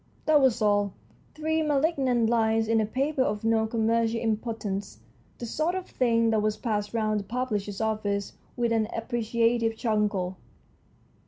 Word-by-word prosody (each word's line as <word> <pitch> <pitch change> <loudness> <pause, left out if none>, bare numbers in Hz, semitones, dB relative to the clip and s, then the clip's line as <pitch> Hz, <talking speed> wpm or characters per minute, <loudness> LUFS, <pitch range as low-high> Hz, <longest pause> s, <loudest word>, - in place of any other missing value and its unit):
That 305 -2 +5
was 240 -4 +3
all, 205 -1 +2 0.4
three 315 +1 0
malignant 275 -6 +1
lines 225 -1 +2
in 225 0 +3
a 215 - -1
paper 270 +4 -1
of 210 -4 0
no 225 0 +2
commercial 230 0 +1
importance, 215 - -3 0.4
the 240 - -6
sort 315 +9 -1
of 375 -1 -3
thing 230 -2 +1
that 220 -1 +2
was 215 0 0
passed 210 -3 -2
round 215 -2 +1
the - - -5
publisher's 210 -3 -3
office 205 -2 -1 0.2
with 235 -1 +1
an 220 -1 +2
appreciative 230 0 0
chuckle. 210 -5 0
225 Hz, 150 wpm, -27 LUFS, 215-240 Hz, 0.4 s, That